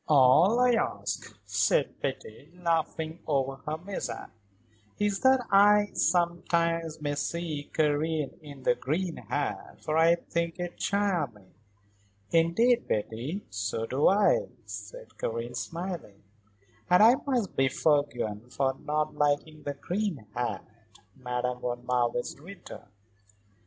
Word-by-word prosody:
"All 155 Hz, -, +6 dB
I 250 Hz, 0 st, +5 dB
ask," 100 Hz, -, -2 dB
said 100 Hz, -1 st, +1 dB
Betty, 135 Hz, +8 st, -5 dB
laughing 165 Hz, -1 st, -1 dB
over 135 Hz, -2 st, 0 dB
her 155 Hz, +1 st, -1 dB
mishap, 190 Hz, +4 st, -6 dB, 0.7 s
"is 205 Hz, -1 st, 0 dB
that 260 Hz, -1 st, +4 dB
I, 205 Hz, +1 st, +6 dB
sometimes, 170 Hz, -1 st, +1 dB
may 145 Hz, -1 st, 0 dB
see 150 Hz, 0 st, -3 dB
Karen 155 Hz, -1 st, +1 dB
in 145 Hz, -3 st, -11 dB
the -, -, +4 dB
green 165 Hz, +7 st, -2 dB
hat, -, -, -4 dB
for 155 Hz, +1 st, 0 dB
I 165 Hz, +1 st, +6 dB
think 170 Hz, 0 st, -3 dB
it 175 Hz, 0 st, -4 dB
charming." 165 Hz, -, -1 dB, 0.8 s
"Indeed, 225 Hz, +9 st, +3 dB
Betty, 120 Hz, -, -3 dB
so 105 Hz, +3 st, -2 dB
do 130 Hz, +5 st, +2 dB
I," 210 Hz, -, +4 dB, 0.2 s
said -, -, -9 dB
Karen, 115 Hz, +1 st, -3 dB
smiling. 170 Hz, -, -5 dB, 0.7 s
"And 180 Hz, +3 st, +6 dB
I 235 Hz, +4 st, +7 dB
must 245 Hz, -8 st, 0 dB
be 135 Hz, 0 st, +3 dB
forgiven 125 Hz, -7 st, 0 dB
for 135 Hz, 0 st, 0 dB
not 150 Hz, +1 st, -1 dB
liking 150 Hz, +1 st, 0 dB
the 145 Hz, -1 st, -4 dB
green 175 Hz, -, -3 dB
hat," 120 Hz, +1 st, -2 dB, 0.5 s
Madame 125 Hz, -1 st, -3 dB
von 120 Hz, 0 st, -4 dB
Marwitz 120 Hz, +1 st, 0 dB
returned. 180 Hz, -, -11 dB
155 Hz, 120 wpm, -28 LUFS, 130-180 Hz, 0.8 s, I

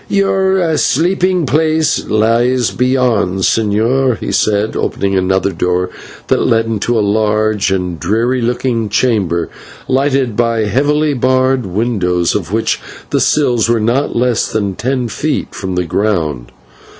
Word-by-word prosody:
"Your 190 Hz, -4 st, +1 dB
sleeping 180 Hz, +5 st, +1 dB
place 155 Hz, +1 st, +1 dB
lies 115 Hz, +3 st, +1 dB
beyond, 125 Hz, -7 st, 0 dB
señor," 115 Hz, +5 st, +1 dB
he -, -, -5 dB
said, 105 Hz, +1 st, 0 dB
opening 100 Hz, 0 st, -1 dB
another 95 Hz, +1 st, +1 dB
door 90 Hz, +1 st, -1 dB, 0.3 s
that -, -, +1 dB
led 115 Hz, 0 st, +2 dB
into 115 Hz, +1 st, -1 dB
a 105 Hz, -, +1 dB
large 105 Hz, 0 st, +1 dB
and 90 Hz, -3 st, -2 dB
dreary 115 Hz, +7 st, 0 dB
looking 120 Hz, -2 st, -1 dB
chamber, 95 Hz, -8 st, 0 dB, 0.4 s
lighted 130 Hz, -3 st, +1 dB
by 115 Hz, -1 st, +1 dB
heavily 145 Hz, +7 st, +1 dB
barred 130 Hz, -1 st, +1 dB
windows, 90 Hz, -4 st, 0 dB
of 95 Hz, -4 st, -3 dB
which 110 Hz, +1 st, -1 dB, 0.3 s
the -, -, +1 dB
sills 120 Hz, -7 st, +2 dB
were 120 Hz, -1 st, +2 dB
not 120 Hz, +6 st, 0 dB
less 120 Hz, -1 st, 0 dB
than 100 Hz, -3 st, -1 dB
ten 125 Hz, +4 st, -2 dB
feet 145 Hz, +8 st, -3 dB
from 95 Hz, -2 st, -4 dB
the 90 Hz, 0 st, -1 dB
ground. 80 Hz, -, -1 dB
115 Hz, 135 wpm, -14 LUFS, 100-130 Hz, 0.4 s, led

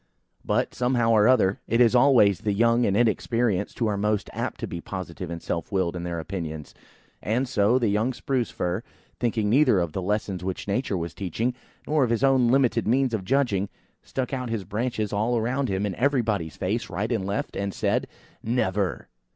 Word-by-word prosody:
But, -, -, 0 dB
somehow 125 Hz, -2 st, +1 dB
or 105 Hz, -1 st, +5 dB
other, 105 Hz, -7 st, +3 dB
it 115 Hz, -, +1 dB
is 120 Hz, -2 st, +5 dB
always 120 Hz, -8 st, +5 dB
the 105 Hz, 0 st, -1 dB
young 115 Hz, +3 st, +3 dB
and 100 Hz, 0 st, +1 dB
inexperienced, 115 Hz, -2 st, +1 dB
who 120 Hz, -, 0 dB
are 105 Hz, -2 st, 0 dB
most 105 Hz, 0 st, -1 dB
apt -, -, -4 dB
to -, -, -2 dB
be 85 Hz, -, -6 dB
positive 90 Hz, -2 st, -6 dB
and 85 Hz, -1 st, -5 dB
self 85 Hz, -1 st, -4 dB
willed 95 Hz, -3 st, 0 dB
in 85 Hz, -, -4 dB
their 85 Hz, -1 st, -3 dB
opinions; 80 Hz, -3 st, -6 dB, 0.5 s
and 120 Hz, +6 st, 0 dB
so, 115 Hz, 0 st, +3 dB
the 120 Hz, -3 st, +1 dB
young 105 Hz, +5 st, +1 dB
Spruce 130 Hz, -2 st, -2 dB
fir, 90 Hz, +3 st, -2 dB, 0.4 s
thinking 110 Hz, -3 st, 0 dB
neither 120 Hz, -3 st, +4 dB
of 85 Hz, -3 st, -1 dB
the 95 Hz, -, -3 dB
lessons 100 Hz, -1 st, -2 dB
which 95 Hz, +1 st, -4 dB
Nature 100 Hz, -1 st, -1 dB
was 85 Hz, -1 st, -4 dB
teaching, 110 Hz, +6 st, -2 dB, 0.3 s
nor 150 Hz, -2 st, +2 dB
of 125 Hz, -, +1 dB
his 115 Hz, +2 st, 0 dB
own 135 Hz, -3 st, +4 dB
limited 130 Hz, -2 st, +2 dB
means 130 Hz, +1 st, +2 dB
of 105 Hz, -4 st, -1 dB
judging 105 Hz, -5 st, +1 dB, 0.3 s
stuck 130 Hz, +1 st, -4 dB
out 125 Hz, -2 st, -3 dB
his 115 Hz, -3 st, -2 dB
branches 110 Hz, -1 st, -2 dB
all 110 Hz, +4 st, +1 dB
around 125 Hz, +4 st, -1 dB
him 95 Hz, +1 st, 0 dB
in 100 Hz, -, -2 dB
everybody's 110 Hz, -, 0 dB
face, 105 Hz, +5 st, -2 dB
right 100 Hz, +6 st, -2 dB
and 110 Hz, -5 st, 0 dB
left, 100 Hz, +1 st, -3 dB
and 100 Hz, 0 st, -2 dB
said– -, -, 0 dB, 0.3 s
"Never!" 105 Hz, -5 st, -1 dB
105 Hz, 195 wpm, -25 LUFS, 95-120 Hz, 0.5 s, or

